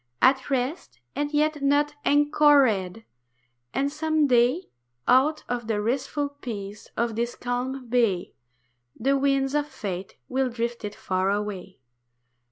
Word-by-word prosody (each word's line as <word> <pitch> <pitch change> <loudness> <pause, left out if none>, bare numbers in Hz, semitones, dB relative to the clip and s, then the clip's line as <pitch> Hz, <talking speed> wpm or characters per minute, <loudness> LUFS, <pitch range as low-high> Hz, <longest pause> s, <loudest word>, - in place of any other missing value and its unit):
At 265 0 +3
rest, 270 +5 -2 0.2
and 290 0 -1
yet 305 0 +1
not 290 +1 +2
anchored; 280 -9 +3 0.7
and 280 - 0
some 310 0 +1
day 250 +6 +3 0.4
Out 275 +5 +4
of 240 -2 -3
the 220 -2 0
restful 260 +6 -1
peace 215 -8 -8
of 235 -1 0
this 235 +1 -2
calm 250 +1 -3
bay 230 -7 +1 0.7
The 275 +4 +2
winds 275 0 +1
of 295 0 +1
Fate 190 -9 -6
will 265 0 0
drift 235 0 -3
it 210 - -5
far 185 0 -1
away. 200 -4 -3
255 Hz, 130 wpm, -25 LUFS, 225-285 Hz, 0.7 s, Out